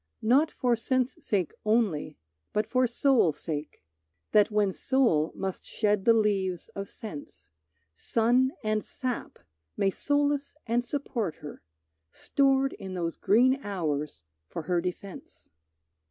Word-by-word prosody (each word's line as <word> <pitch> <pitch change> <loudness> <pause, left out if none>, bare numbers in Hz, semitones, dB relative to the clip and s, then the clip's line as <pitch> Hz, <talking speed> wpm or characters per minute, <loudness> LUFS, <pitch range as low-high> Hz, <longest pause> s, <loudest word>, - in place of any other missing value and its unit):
Not 270 +8 +4
for 245 -2 +1
sense 255 +2 0
sake 190 -6 0
only, 210 -9 +1 0.4
but 210 +1 +1
for 255 +3 +2
soul 240 - +3
sake; 150 - -6 0.5
That 210 0 +5
when 210 -2 +2
soul 190 - +2
must 190 -1 -4
shed 210 -2 0
the 230 - +7
leaves 195 -5 0
of 195 0 -6
sense, 150 - -10 0.4
Sun 240 - +2
and 215 0 0
sap 255 -2 -5 0.4
may 195 - +2
solace 285 +3 0
and 240 +1 +1
support 240 - -3
her, 145 - -10 0.5
Stored 270 - +1
in 190 -1 -7
those 170 -2 -2
green 255 +5 +3
hours 150 - -3 0.2
for 165 - -6
her 175 +2 0
defence. 185 +2 -7
215 Hz, 125 wpm, -28 LUFS, 180-255 Hz, 0.5 s, the